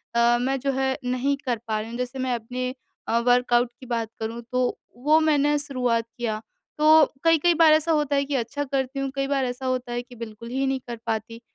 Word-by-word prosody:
अ, 235 0 +4
मैं 265 +2 0
जो 275 +2 0
है 265 0 0
नहीं 255 +3 0
कर 245 -3 0
पा 215 -1 0
रही 220 +1 -6
हूँ, 235 - -6
जैसे 250 +1 -4
मैं 255 -1 0
अपने 250 +2 -4 0.4
अ, 230 - +2
वर्कआउट 245 0 +3
की 260 - -11
बात 230 -2 -2
करूँ 225 +1 -4
तो 250 0 0 0.2
वो 300 +5 +4
मैंने 295 -2 +3
शुरुआत 250 -5 0
किया। 220 -3 -2 0.4
तो 310 0 +7 0.2
कई-कई 330 +1 +4
बार 325 -1 +6
ऐसा 310 +1 +2
होता 295 -2 +1
है 280 0 +2
कि 280 0 -2
अच्छा 265 +4 -2
करती 275 -1 -2
हूँ, 275 - -1
कई 275 0 -1
बार 275 -1 +1
ऐसा 250 +1 -4
होता 255 -1 -1
है 240 0 -2
कि 245 0 -15
बिल्कुल 230 0 -8
ही 265 +2 -1
नहीं 265 0 0
कर 240 -1 -5
पाती, 225 +1 -3
255 Hz, 225 wpm, -25 LUFS, 240-280 Hz, 0.4 s, तो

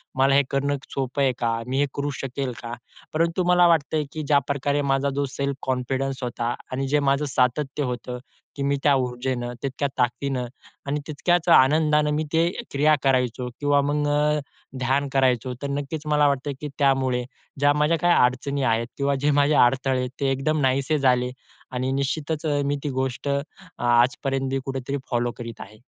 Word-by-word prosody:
मला 135 +1 +4
हे 140 - +6
करणं 140 +1 0
क 135 - -18
सोपं 135 +1 -2
आहे 135 - +4
का? 115 -1 0
मी 130 +1 -1
हे 145 - +4
करू 145 +1 -2
शकेल 135 0 -3
का?" 120 0 -6 0.4
परंतु 165 +3 +1
मला 180 0 +3
मला 175 0 +6
वाटतंय, 160 -2 +2
की 155 -1 -5
ज्या 145 0 +4
प्रकारे 140 +1 0
माझा 140 0 +1
जो 140 0 0
सेल्फ 140 +1 -3
कॉन्फिडन्स 130 +1 -2
होता 120 0 -2 0.2
आणि 135 +1 -2
जे 145 +2 +2
माझं 140 +1 +1
सातत्य 135 +2 0
होतं, 125 0 -4 0.4
की 140 - -3
मी 140 0 +1
त्या 145 - +5
ऊर्जेनं, 125 -1 -2
तितक्या 140 +1 -1
ताकदीनं 125 +1 0 0.4
आणि 145 +1 -1
तितक्याच 170 +3 0
आनंदानं 150 +2 +4
मी 155 +1 0
ते 165 +1 +3 0.2
क्रिया 150 +2 +4
करायचो 125 -2 +1
किंवा 145 0 +3
मग 145 +1 0
अ, 150 +1 +2 0.4
ध्यान 135 +3 +1
करायचो. 130 -2 +2
तर 140 - -2
नक्कीच 145 +2 -3
मला 150 -1 +4
वाटतं, 140 0 -1
की 150 - -3
त्यामुळे 130 -3 +2 0.4
ज्या 145 0 +4
माझ्या 150 +3 +2
काही 175 +2 +3
अडचणी 135 +3 0
आहेत 115 -1 +1
किंवा 140 0 +1
जे 150 - +3
माझे 145 +1 +3
अडथळे 130 0 +3
ते 135 -1 +1
एकदम 140 +3 0
नाहीसे 135 +3 +1
झाले 125 -2 +2 0.4
आणि 130 +1 -2
निश्चितच 150 +4 -2
अ, 145 -2 +1
मी 145 +1 0
ती 150 - -1
गोष्ट 130 +1 -2 0.5
आजपर्यंत 130 +3 +2
बी 135 0 -1
कुठेतरी 135 +1 -3
फॉलो 120 0 +1
करीत 115 -1 -8
आहे. 110 +2 -11
140 Hz, 180 wpm, -24 LUFS, 130-145 Hz, 0.5 s, हे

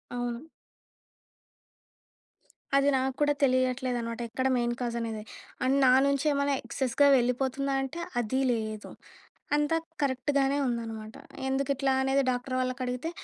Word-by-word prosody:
అవును. 245 +4 -4 2.3
అది 280 +1 +4
నాకు 260 0 -1
కూడా 290 0 +4
తెలియట్లేదనమాట. 255 -2 0
ఎక్కడ 260 +3 -1
మెయిన్ 240 0 0
కాజ్ 235 -1 -2
అనేది? 225 -2 -4 0.4
అండ్ 270 +2 +3
నా 255 - +6 0.2
నుంచి 280 +1 0
ఏమైనా 280 0 +1
ఎక్సెస్‌గా 265 +3 +1
వెళ్ళిపోతుందా? 260 +3 0
అంటే 300 +6 -6 0.2
అది 260 +4 -1
లేదు. 215 -2 -3 0.7
అంతా 295 +2 +1 0.3
కరెక్ట్‌గానే 275 +1 +1
ఉందనమాట. 225 -3 -4 0.3
ఎందుకు 270 +1 -1
ఇట్లా 270 0 +1
అనేది 270 +1 +2
డాక్టర్ 250 +1 -3
వాళ్ళకి 255 0 -2
అడిగితే? 250 +6 -3
255 Hz, 120 wpm, -28 LUFS, 240-275 Hz, 2.3 s, నా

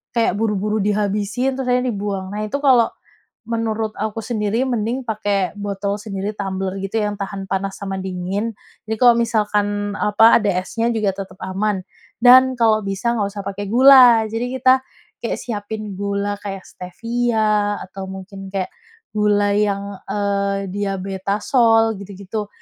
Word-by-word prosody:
kayak 230 -1 +2
buru-buru 210 -1 0
dihabisin, 210 +5 0
terus 265 - -3
akhirnya 250 0 +2
dibuang. 195 -2 -4
Nah, 210 - -3
itu 245 - -2
kalau 250 -5 +5 0.6
menurut 225 -1 -1
aku 220 +1 -3
sendiri 220 +1 -1
mending 240 +1 -1
pakai 205 -3 0
botol 200 0 -2
sendiri, 200 -1 -4
tumbler 190 -1 -3
gitu, 195 +2 -5
yang 210 0 -1
tahan 195 0 -4
panas 195 0 -2
sama 195 -1 -4
dingin. 190 +4 -3 0.3
Jadi 220 - -1
kalau 245 -2 +7
misalkan 205 -2 0
apa, 225 +3 +5
ada 210 - -1 0.2
esnya 230 +4 -2
juga 210 -3 +1
tetap 195 -1 -7
aman. 190 +1 -1 0.4
Dan 255 +1 +7
kalau 220 -2 +4
bisa 195 +4 -1
nggak 205 -3 0
usah 200 -1 -6
pakai 200 +1 -4
gula, 245 0 +7
jadi 230 +2 -2
kita 255 +1 +6 0.5
kayak 235 - -2
siapin 215 -2 -5
gula 200 0 -2
kayak 195 -2 -6
Stevia, 215 +1 -1
atau 190 +1 -8
mungkin 195 +1 -8
kek 190 -2 -2 0.5
gula 205 -1 +2
yang, 200 -1 0 0.2
eee, 200 -1 -1
Diabetasol 205 +4 +1
gitu-gitu. 200 +2 -6
205 Hz, 145 wpm, -20 LUFS, 195-225 Hz, 0.6 s, kalau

